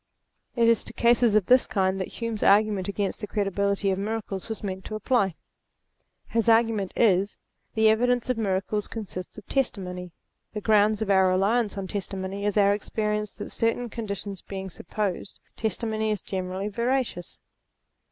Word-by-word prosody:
It 235 Hz, -2 st, +4 dB
is 230 Hz, -1 st, +4 dB
to -, -, -7 dB
cases 235 Hz, -2 st, +4 dB
of 210 Hz, -4 st, +4 dB
this 255 Hz, +4 st, +5 dB
kind 190 Hz, -1 st, 0 dB
that 185 Hz, -, -2 dB
Hume's 230 Hz, -3 st, -4 dB
argu 215 Hz, +2 st, +5 dB
ment 190 Hz, -2 st, -3 dB
against 200 Hz, 0 st, -2 dB
the 210 Hz, -, -4 dB
credibility 200 Hz, -1 st, 0 dB
of 190 Hz, -, -1 dB
miracles 210 Hz, -1 st, -4 dB
was 220 Hz, -, -5 dB
meant 190 Hz, -1 st, -4 dB
to 215 Hz, -, -5 dB
apply. 210 Hz, -4 st, +1 dB, 0.9 s
His 230 Hz, 0 st, +1 dB
argument 225 Hz, -4 st, +3 dB
is: 200 Hz, -2 st, +3 dB, 0.4 s
The 220 Hz, 0 st, +4 dB
evidence 245 Hz, +2 st, +3 dB
of 255 Hz, -, +1 dB
miracles 205 Hz, -1 st, -1 dB
consists 190 Hz, -5 st, -6 dB
of -, -, -10 dB
testimony. 180 Hz, -9 st, -2 dB, 0.4 s
The 210 Hz, -, -4 dB
ground 215 Hz, 0 st, +3 dB
of 200 Hz, -, -1 dB
our 190 Hz, -1 st, +5 dB
reliance 205 Hz, +4 st, +1 dB
on 195 Hz, -, -3 dB
testimony 195 Hz, 0 st, -4 dB
is 205 Hz, 0 st, 0 dB
our 200 Hz, -1 st, +5 dB
experience 210 Hz, 0 st, -2 dB
that 205 Hz, -, -7 dB
certain 230 Hz, +1 st, -1 dB
conditions 200 Hz, -4 st, -5 dB
being 190 Hz, -1 st, -6 dB
supposed, 195 Hz, +2 st, -4 dB, 0.2 s
testimony 220 Hz, 0 st, -1 dB
is 210 Hz, -4 st, -1 dB
generally 190 Hz, +1 st, -3 dB
veracious. 235 Hz, -4 st, -2 dB
205 Hz, 160 wpm, -26 LUFS, 195-225 Hz, 0.9 s, this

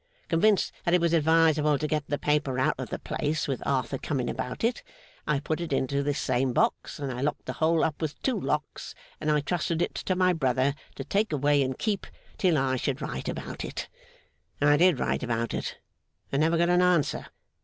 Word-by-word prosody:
Convinced 195 Hz, +5 st, +3 dB
that 175 Hz, 0 st, +3 dB
it -, -, +4 dB
was 170 Hz, -1 st, +1 dB
advisable 160 Hz, -2 st, +4 dB
to 155 Hz, -, -2 dB
get 150 Hz, -2 st, -1 dB
the 145 Hz, -, -1 dB
paper 145 Hz, -4 st, 0 dB
out 130 Hz, -, +2 dB
of -, -, -4 dB
the -, -, -3 dB
place, 155 Hz, +1 st, -2 dB
with 135 Hz, -3 st, -2 dB
Arthur 130 Hz, 0 st, 0 dB
coming 135 Hz, -5 st, -2 dB
about 125 Hz, -, -5 dB
it, 235 Hz, +2 st, +1 dB, 0.5 s
I 150 Hz, -2 st, +2 dB
put 155 Hz, +3 st, -2 dB
it 170 Hz, -, -4 dB
into 140 Hz, +1 st, 0 dB
this 145 Hz, 0 st, -1 dB
same 125 Hz, 0 st, 0 dB
box, -, -, 0 dB
and 140 Hz, -2 st, -3 dB
I 125 Hz, -, -5 dB
locked 150 Hz, +2 st, -2 dB
the -, -, -3 dB
whole 165 Hz, 0 st, +2 dB
up 155 Hz, 0 st, -1 dB
with 155 Hz, -2 st, -3 dB
two 260 Hz, -, +1 dB
locks, -, -, -3 dB, 0.2 s
and -, -, -2 dB
I 150 Hz, -1 st, +3 dB
trusted 165 Hz, +2 st, -1 dB
it -, -, 0 dB
to 185 Hz, -, -2 dB
my 185 Hz, 0 st, +3 dB
brother 135 Hz, -3 st, +1 dB, 0.2 s
to 135 Hz, -, -5 dB
take 205 Hz, +9 st, 0 dB
away 145 Hz, 0 st, +3 dB
and 130 Hz, -1 st, -1 dB
keep, 205 Hz, -3 st, -1 dB, 0.3 s
till 180 Hz, -5 st, +3 dB
I 130 Hz, -1 st, +1 dB
should 135 Hz, +1 st, -2 dB
write -, -, -4 dB
about -, -, -5 dB
it. -, -, -5 dB, 0.7 s
I 145 Hz, 0 st, +5 dB
did 175 Hz, -1 st, +4 dB
write -, -, 0 dB
about 115 Hz, -2 st, -1 dB
it, -, -, -3 dB, 0.5 s
and 140 Hz, -, +1 dB
never 165 Hz, +2 st, +3 dB
got 170 Hz, +1 st, +3 dB
an 180 Hz, 0 st, +4 dB
answer. 180 Hz, -5 st, +2 dB
150 Hz, 210 wpm, -27 LUFS, 135-170 Hz, 0.7 s, I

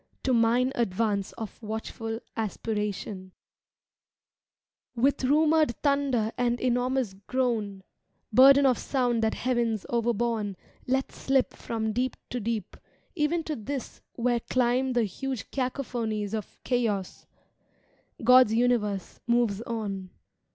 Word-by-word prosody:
To 260 Hz, -, +2 dB
mine 240 Hz, +2 st, +3 dB
advance 205 Hz, -3 st, 0 dB
of 220 Hz, 0 st, -8 dB
watchful 225 Hz, +1 st, -5 dB
aspiratioa 210 Hz, -3 st, -3 dB, 1.7 s
With 265 Hz, +3 st, +2 dB
rumoured 305 Hz, -1 st, +3 dB
thunder 280 Hz, -6 st, +2 dB
and 240 Hz, -1 st, +1 dB
enormous 250 Hz, -2 st, 0 dB
groan 225 Hz, -7 st, -1 dB, 0.5 s
(Burden 275 Hz, +4 st, +8 dB
of 255 Hz, -2 st, +3 dB
sound 245 Hz, -4 st, 0 dB
that 220 Hz, 0 st, +1 dB
heavens 235 Hz, -4 st, 0 dB
overborne 230 Hz, -4 st, 0 dB, 0.3 s
Let 265 Hz, +1 st, 0 dB
slip 270 Hz, -1 st, +1 dB
from 220 Hz, -1 st, -3 dB
deep 250 Hz, +3 st, -1 dB
to 245 Hz, -, -2 dB
deep, 225 Hz, -1 st, -3 dB, 0.4 s
even 325 Hz, 0 st, 0 dB
to 310 Hz, -1 st, -3 dB
this 265 Hz, +3 st, -6 dB
Where 240 Hz, 0 st, +1 dB
dimb 250 Hz, +2 st, +1 dB
the 240 Hz, -, +3 dB
huge 240 Hz, +3 st, -4 dB
cacophonies 240 Hz, -6 st, -2 dB
of 215 Hz, -2 st, -5 dB
Chaos) 220 Hz, -7 st, -1 dB, 1.0 s
God's 250 Hz, -2 st, +6 dB
universe 225 Hz, -5 st, 0 dB
moves 235 Hz, -4 st, +2 dB
on. 205 Hz, -5 st, -4 dB
235 Hz, 110 wpm, -27 LUFS, 220-255 Hz, 1.7 s, Burden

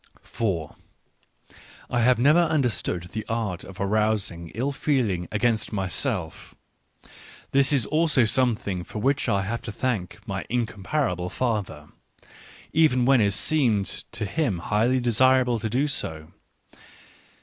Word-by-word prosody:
I 120 Hz, -, +1 dB
have 125 Hz, +2 st, +4 dB
never 145 Hz, +8 st, +5 dB
understood 125 Hz, -, 0 dB
the 110 Hz, -, -4 dB
art 110 Hz, -6 st, -2 dB
of 95 Hz, -, -12 dB
arousing 100 Hz, -4 st, 0 dB
ill 130 Hz, +5 st, -1 dB
feeling 115 Hz, -, 0 dB
against 110 Hz, +1 st, 0 dB
myself, 95 Hz, -, -2 dB, 0.5 s
— -, -, -20 dB
this 135 Hz, +1 st, +3 dB
is 135 Hz, -6 st, +2 dB
also 155 Hz, -5 st, +2 dB
something 110 Hz, -6 st, 0 dB
for 105 Hz, -, -9 dB
which 135 Hz, +5 st, +1 dB
I 100 Hz, -1 st, +1 dB
have 115 Hz, +4 st, -3 dB
to 115 Hz, -, -6 dB
thank 105 Hz, -6 st, -2 dB
my -, -, -3 dB
incomparable 110 Hz, -, -1 dB
father, 110 Hz, -5 st, -3 dB, 0.5 s
— -, -, -20 dB, 0.3 s
even 150 Hz, -6 st, +4 dB
when 130 Hz, -2 st, +5 dB
it 100 Hz, -1 st, +2 dB
seemed 115 Hz, -7 st, +1 dB
to -, -, -2 dB, 0.3 s
me 90 Hz, -, -3 dB
highly 110 Hz, +8 st, +1 dB
desirable 125 Hz, 0 st, +3 dB
to 110 Hz, -, -3 dB
do 130 Hz, +7 st, +1 dB
so. 80 Hz, -, -4 dB
115 Hz, 130 wpm, -25 LUFS, 100-130 Hz, 0.5 s, never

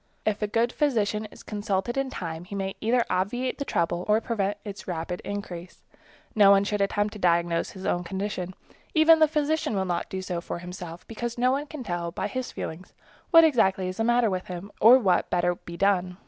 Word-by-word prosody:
If 215 Hz, -1 st, 0 dB
a 210 Hz, -, +1 dB
good 230 Hz, +3 st, +1 dB
physician 220 Hz, -7 st, 0 dB
is -, -, -14 dB
consulted 205 Hz, +1 st, -2 dB
in 270 Hz, -1 st, -1 dB
time, 165 Hz, -7 st, -6 dB
he 200 Hz, -, -7 dB
may 195 Hz, -1 st, -2 dB
either 235 Hz, +2 st, +2 dB
obviate 245 Hz, +9 st, -1 dB
the 280 Hz, -, -2 dB
trouble 175 Hz, -3 st, 0 dB
or 210 Hz, +1 st, +4 dB
prevent 205 Hz, -3 st, -2 dB
its 200 Hz, -1 st, -8 dB
rapid 175 Hz, 0 st, -4 dB
increase. 185 Hz, -3 st, -7 dB, 0.5 s
No 205 Hz, -3 st, +6 dB
one 200 Hz, 0 st, +6 dB
should 210 Hz, 0 st, -1 dB
attempt 205 Hz, +1 st, 0 dB
to 210 Hz, -, -9 dB
diagnose 170 Hz, -2 st, +1 dB
his 190 Hz, -1 st, -9 dB
own 175 Hz, -, 0 dB
condition. 190 Hz, 0 st, -4 dB, 0.4 s
Even 320 Hz, +1 st, +7 dB
the 315 Hz, -, +6 dB
physician 300 Hz, -4 st, 0 dB
will 190 Hz, -1 st, 0 dB
not 175 Hz, -2 st, -2 dB
do 190 Hz, 0 st, -4 dB
so 175 Hz, -2 st, -3 dB
for 170 Hz, -, -5 dB
himself, 175 Hz, -1 st, -8 dB
because 235 Hz, +1 st, -5 dB
no 250 Hz, +1 st, +3 dB
one 285 Hz, +3 st, -1 dB
can 290 Hz, -3 st, -7 dB
tell 175 Hz, -4 st, -3 dB
by -, -, -3 dB
his 255 Hz, -1 st, -4 dB
feelings 165 Hz, +4 st, -7 dB, 0.4 s
exactly 260 Hz, -, +5 dB
what -, -, -1 dB
is 185 Hz, -, -6 dB
the 225 Hz, -, 0 dB
matter 240 Hz, -2 st, +3 dB
with 185 Hz, 0 st, -3 dB
him 180 Hz, +3 st, -7 dB
or 235 Hz, +4 st, +9 dB
what 195 Hz, -8 st, +2 dB
would -, -, -37 dB
better 175 Hz, 0 st, +2 dB
be 170 Hz, 0 st, -10 dB
done. 185 Hz, -2 st, +1 dB
200 Hz, 215 wpm, -26 LUFS, 180-235 Hz, 0.5 s, or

